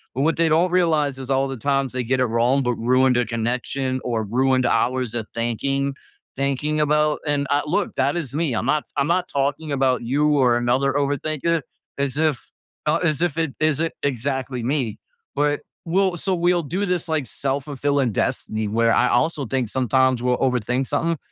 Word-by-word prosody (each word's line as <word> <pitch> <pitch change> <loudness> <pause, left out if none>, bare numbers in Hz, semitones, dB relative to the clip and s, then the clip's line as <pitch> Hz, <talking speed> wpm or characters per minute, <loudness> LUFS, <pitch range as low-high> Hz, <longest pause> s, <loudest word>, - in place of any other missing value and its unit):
But 135 - -1
what 165 +2 +2
they 165 -1 +3
don't 170 +3 +3
realize 155 -6 +2
is 130 0 -7
all 135 0 +2
the 135 - -4
times 135 +1 0
they 125 -1 -1
get 130 +2 0
it 130 - +3
wrong, 120 +4 +2
but 125 -1 0
ruined 130 +2 +3
their 125 0 +2
connection 125 +3 -2
or 115 -3 -1
ruined 130 +4 +2
hours 125 -1 +1
of 115 -2 -3
thinking, 135 +4 -1 0.4
thinking 140 +3 0
about 150 0 +2
and, 145 -1 0
uh, 145 0 +2
look, 180 +5 -1
that 145 +5 +1
is 140 -7 -4
me. 150 -4 0
I'm 115 - -1
not 150 +3 +1
I'm 140 0 +2
not 180 +1 +1
talking 140 +2 -1
about 130 -2 +1
you 140 +5 +1
or 125 -3 +4
another 125 +3 +1
overthinker 150 +3 0 0.4
as 140 0 -1
if 155 -4 +1 0.4
thou 150 +2 +3
as 155 -4 0
if 170 -3 0
it 160 -4 -1
isn't 155 +1 +1
exactly 130 -1 -2
me. 125 -4 -1 0.4
But 145 0 +1 0.2
we'll 185 +1 +1
so 190 +3 -1
we'll 175 0 +2
do 185 +7 -2
this, 180 -2 -1
like, 155 -5 -1
self-fulfilling 140 0 -1
destiny 110 +2 -1
where 115 +2 +2
I - - +3
also 150 +3 +1
think 125 -1 -1
sometimes 130 0 +2
we'll 125 -1 +2
overthink 125 0 0
something, 165 0 0
135 Hz, 185 wpm, -22 LUFS, 125-155 Hz, 0.4 s, or